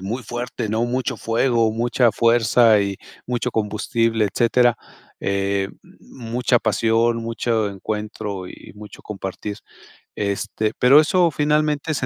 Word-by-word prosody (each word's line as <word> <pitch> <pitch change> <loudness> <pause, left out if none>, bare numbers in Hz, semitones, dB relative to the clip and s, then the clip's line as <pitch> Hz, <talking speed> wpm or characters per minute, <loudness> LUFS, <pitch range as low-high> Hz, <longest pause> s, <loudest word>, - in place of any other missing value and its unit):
muy 110 +7 -4
fuerte, 120 -1 -5
¿no? 110 +2 0
Mucho 125 +1 -2
fuego, 115 0 +1
mucha 120 +1 +2
fuerza 115 -1 +4
y 100 -1 -2 0.3
mucho 125 0 -2
combustible, 110 +1 0
etcétera, 120 +1 +3 0.4
eh, 100 0 -1 0.3
mucha 120 0 -1
pasión, 115 +2 +1
mucho 115 -1 -1
encuentro 100 -1 -5
y - - -10 0.2
y - - -16
mucho 105 0 -12
compartir. 100 0 -6 0.6
Este, 105 +1 -2
pero 135 +4 +7
eso 170 +2 +2
finalmente 150 +1 0
se 135 - -2
115 Hz, 125 wpm, -21 LUFS, 105-125 Hz, 0.6 s, pero